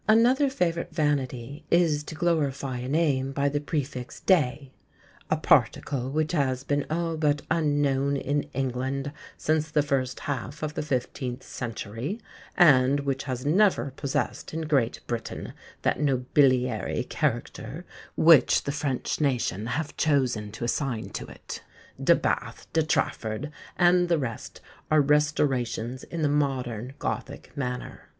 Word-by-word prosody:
Another 245 +6 +5
favourite 170 -11 -1
vanity 145 -3 -1
is 165 -4 +3
to 155 - -7
glorify 145 -6 0
a 125 - -5
name 140 -3 +1
by 140 +1 +1
the 145 +1 -1
prefix 140 -4 -4
De: 140 -6 +2 0.6
"a - - +2
particle 130 -2 +2
which 155 +2 0
has 135 -5 0
been 145 0 -1
all 165 +1 -1
but 150 -2 +1
unknown 145 -3 +2
in 145 +2 -1
England 135 +1 -2 0.3
since 155 0 0
the 150 -1 +2
first 135 -3 -1
half 145 +2 -4
of 150 -1 -2
the - - -2
fifteenth 130 -2 -3
century, 115 - -5 0.4
and 140 -4 +6
which 135 0 -2
has 130 -1 -4
never 180 -2 +3
possessed 140 +3 -3
in 165 - -1
Great 140 -7 +1
Britain 120 -1 -5 0.3
that - - +1
nobiliary 130 -4 +2
character - - -2 0.3
which 160 -4 +6
the 140 - -2
French 140 -1 -2
nation 115 -7 0
have 145 +6 -3
chosen 125 -8 +1
to 115 +2 -7
assign 120 -2 -2
to - - -5
it. - - -8 0.4
De - - +6
Bathe, - - -2
De 160 - +4
Trafford, 145 -3 -1 0.3
and 175 0 +4
the 170 - +4
rest 125 -6 -5 0.3
are 155 0 +5
restorations 135 -4 +1
in 165 -2 -4
the - - +4
modern 130 -4 -1
Gothic 140 +1 -5
manner." 125 -3 -5
140 Hz, 140 wpm, -27 LUFS, 130-155 Hz, 0.6 s, and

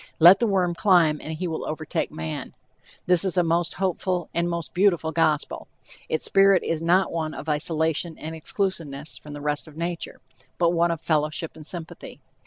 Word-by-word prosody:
Let 175 +4 +8
the 235 - +2
worm 185 -4 +1
climb 170 -5 +3
and 160 - -5
he 175 +3 -3
will 160 -1 -3
overtake 155 0 -3
man. 80 0 -6 0.5
This 180 -1 +3
is 190 -1 -1
a 180 - +5
most 170 +1 +1
hopeful, 185 -2 -1
a 170 - +1
most 170 -1 -3
beautiful 175 -4 +2
gospel. 155 -2 0 0.4
Its 160 - 0
spirit 195 -1 +4
is 165 -1 -1
not 180 +3 +3
one 160 -2 -3
of - - -8
isolation 160 +2 0
and 160 +1 -6
exclusiveness 160 -4 -3
from 150 - -10
the 145 - -7
rest 150 +1 -1
of 155 -1 -14
nature, 170 0 -4 0.4
but 170 -1 +3
one 170 0 +2
of 165 -2 -2
fellowship 155 0 0
and 155 -1 -9
sympathy. 170 -2 -8
165 Hz, 185 wpm, -24 LUFS, 155-175 Hz, 0.5 s, Let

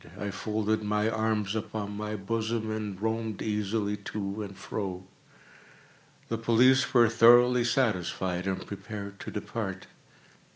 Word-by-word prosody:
I 100 -1 -3
folded 110 +2 -1
my 105 +1 +1
arms 110 -2 0
upon 105 -1 -4
my 105 +1 -3
bosom, 110 +2 -2
and 105 -3 -4
roamed 110 -1 -2
easily 105 -1 -1
to 100 0 -4
and 100 -2 -7
fro. 95 -3 -4 1.2
The 115 - -2
police 130 +5 +4
were 120 -3 +6
thoroughly 120 +2 +6
satisfied 95 -7 0
and 95 -1 -2
prepared 100 -1 -7
to - - -6
depart. 105 -3 -4
105 Hz, 125 wpm, -29 LUFS, 100-115 Hz, 1.2 s, were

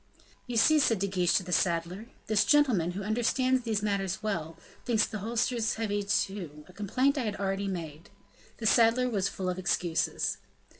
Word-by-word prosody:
"You 245 -2 -3
see," 305 +7 +5
said 230 -6 +3
De 195 - -1
Guiche 185 -3 +1
to - - +2
the 180 - -8
saddler, 175 +4 0 0.2
"this 215 -2 +2
gentleman, 240 - +3
who 195 +2 -5
understands 250 +4 +1
these 220 -3 -2
matters 195 -1 -2
well, 165 -7 -3 0.3
thinks 225 -3 +2
the 215 - -6
holsters 230 +1 -1
heavy, 205 -2 -2 0.6
a 180 - -16
complaint 255 +9 0
I 250 - -2
had 210 -2 -2
already 195 0 -2
made." 165 -4 -6 0.5
The 225 - -6
saddler 230 +4 +4
was 195 -3 0
full 185 - -5
of 180 0 -2
excuses. 175 -2 -1
205 Hz, 170 wpm, -29 LUFS, 185-230 Hz, 0.6 s, see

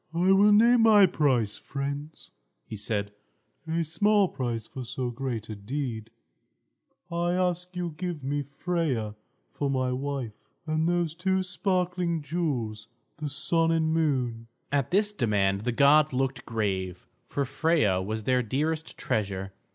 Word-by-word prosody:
"I 180 +3 +3
will 200 +2 +6
name 235 +3 +6
my 215 -3 +7
price, 130 - +1
friends," 140 +2 -5 0.3
he - - -7
said; 105 -1 -2 0.6
"a 165 +1 0
small 205 +4 +3
price 120 -3 -3
for 130 - -7
so 125 +1 -3
great 120 -3 -4
a 110 - -6
deed. 115 +1 -4 1.0
I 170 +1 0
ask 180 0 -1
you 175 -1 -2
to 155 - -12
give 175 -5 -4
me 145 +2 -1
Freia 140 -6 -2 0.4
for 140 - -2
my 130 -2 0
wife, 130 -3 -3 0.3
and 155 +1 +1
those 175 -3 0
two 190 +2 0
sparkling 180 -3 -1
jewels, 130 -10 -2 0.3
the 150 -1 -4
Sun 165 +3 +2
and 160 -1 +1
Moon." 125 -8 0 0.2
At 140 -3 +1
this 205 +3 +2
demand 100 - +1
the 125 - +1
gods 145 +3 +5
looked 130 -1 -1
grave; 95 -5 -2 0.2
for 140 - -1
Freia 140 - +2
was 110 +3 -3
their 125 +2 +2
dearest 155 +7 -2
treasure. 95 -2 -2
140 Hz, 145 wpm, -27 LUFS, 115-170 Hz, 1.0 s, my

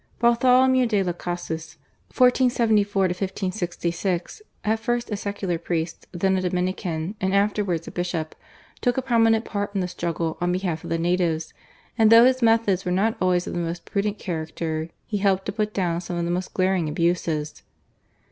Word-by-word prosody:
Bartholomew 250 +2 +4
de 205 -4 +1
Las 175 -2 -1
Casas 165 -2 -5 0.3
(1474 235 -6 +3
1566) 185 - -2 0.2
at 220 +1 +1
first 240 0 -2
a - - 0
secular 200 -4 -3
priest, 165 -1 -3
then 190 +2 +1
a 185 - 0
Dominican, 180 -1 -2
and 190 +1 +1
afterwards 200 -4 0
a - - -6
bishop, 175 -3 -3 0.5
took 245 -1 +1
a 265 - 0
prominent 225 -3 +3
part 205 0 -3
in 195 - +1
the 180 - -1
struggle 170 -2 -3
on 175 0 +1
behalf 180 -3 -2
of - - -7
the 165 - 0
natives, 165 -2 0 0.5
and 220 0 +6
though 230 +1 +9
his 255 0 +3
methods 225 -5 +3
were 180 - -2
not 210 +5 +1
always 180 -1 +2
of - - -5
the - - -2
most 170 0 -4
prudent 205 +1 -1
character 160 -2 -4 0.2
he 210 - -2
helped 195 -1 +2
to - - -2
put 215 0 -1
down 175 -4 -1
some 175 0 -5
of 170 - -1
the 170 - -1
most 180 +1 -2
glaring 185 -4 +1
abuses. 160 -2 -1
185 Hz, 175 wpm, -24 LUFS, 170-215 Hz, 0.5 s, though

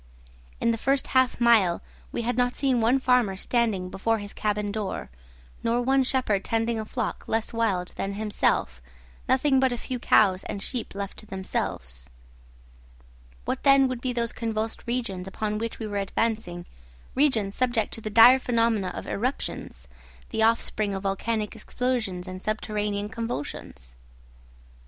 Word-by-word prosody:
In 230 - +2
the 230 - -2
first 270 +2 +1
half 260 -2 +2
mile 220 -8 +5 0.3
we 235 - -2
had 245 +2 0
not 245 0 +1
seen 260 -4 +1
one 235 +4 +4
farmer 250 -7 +2
standing 215 -4 0
before 225 +3 0
his 205 -1 -7
cabin 210 -1 -1
door, 205 - -4 0.5
nor 230 +1 +1
one 265 +2 +3
shepherd 245 -7 +1
tending 225 0 0
a 215 - -4
flock 230 0 -3
less 225 +1 -1
wild 200 -6 0
than 195 0 -2
himself, 205 - 0 0.5
nothing 265 +1 +4
but 265 -1 +3
a 245 - -2
few 250 +1 -4
cows 195 -5 +4
and 200 - -5
sheep 240 -6 -4
left 200 -1 -5
to 215 - -9
themselves. 60 - -4 1.4
What - - -2
then 275 -1 +6
would 255 -2 -4
be 255 - -1
those 235 -1 -1
convulsed 225 -1 -3
regions 230 -7 -2
upon 210 +2 -2
which 230 0 -4
we 225 - -5
were 205 -1 -3
advancing, 195 -3 -1 0.5
regions 235 -8 +2
subject 240 -3 0
to 225 - -3
the 215 - -4
dire 230 +5 +8
phenomena 230 -5 +1
of - - -6
eruptions, 250 +6 -4 0.4
the 220 - -1
offspring 220 -2 +2
of 190 - -5
volcanic 210 +3 -1
explosions 220 -5 -2
and 185 0 -7
subterranean 210 -1 -2
convulsions? 145 - -6
225 Hz, 155 wpm, -26 LUFS, 200-245 Hz, 1.4 s, dire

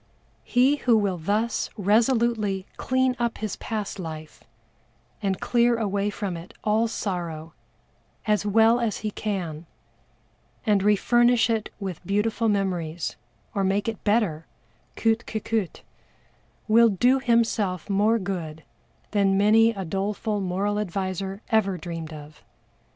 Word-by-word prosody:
He 260 +4 +3
who 240 -5 +3
will 195 -4 0
thus 210 +8 -1
resolutely 215 -2 +2
clean 260 0 +1
up 235 -1 -1
his 215 -2 -4
past 210 -3 -4
life 155 -3 -8 0.8
and 195 -2 -1
clear 235 -1 +2
away 205 -2 0
from 200 -3 -4
it 170 +2 -10
all 220 +2 +2
sorrow 170 -7 -4 0.7
as 210 -1 +2
well 225 +3 +4
as 230 -4 -2
he 215 - -1
can, 175 -7 -4 1.0
and 205 -3 +3
refurnish 235 +3 +3
it 220 -2 -1
with 190 -5 -5
beautiful 220 +3 0
memories, 175 -5 -1 0.4
or 200 - 0
make 195 +3 0
it 225 -1 -4
better, 205 -8 +1 0.5
coûte 225 +1 +1
que 220 - -3
coûte, 215 -4 -2 0.9
will 230 +1 +6
do 245 +7 +3
himself 225 - +1
more 210 +3 +3
good 170 -6 -5 0.5
than 195 -2 +2
many 220 +3 +5
a 195 -4 -4
doleful 205 +4 -2
moral 195 +3 -1
adviser 195 +1 -3
ever 200 -4 +2
dreamed 165 -1 -6
of. 150 0 -11
205 Hz, 130 wpm, -25 LUFS, 185-225 Hz, 1.0 s, will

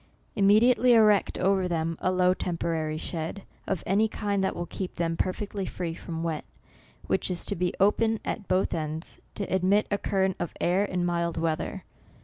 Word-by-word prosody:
Immediately 230 +5 +5
erect 215 -3 +4
over 190 0 +2
them 165 -1 -1
a 185 - +2
low 180 0 +3
temporary 165 -3 -2
shed, 165 +4 -5 0.2
of 190 -4 -2
any 205 +4 +3
kind 205 -2 -1
that 190 - 0
will 175 - -3
keep 185 +1 -6
them 165 -1 -1
perfectly 200 +3 -2
free 170 -2 -4
from 165 0 -6
wet, 160 -2 -2 0.6
which - - 0
is 180 -1 -1
to 200 - +1
be 180 0 0
open 220 +3 +3
at 205 - -4
both 185 +1 +1
ends, 155 0 -4 0.2
to 200 - -2
ad 190 -1 +1
mit 200 +3 +4
a 200 - +1
current 190 -1 0
of 175 - -3
air 180 +3 +2
in 180 -3 -1
mild 170 -1 -1
weather. 160 -1 -2
185 Hz, 180 wpm, -27 LUFS, 170-200 Hz, 0.6 s, Immediately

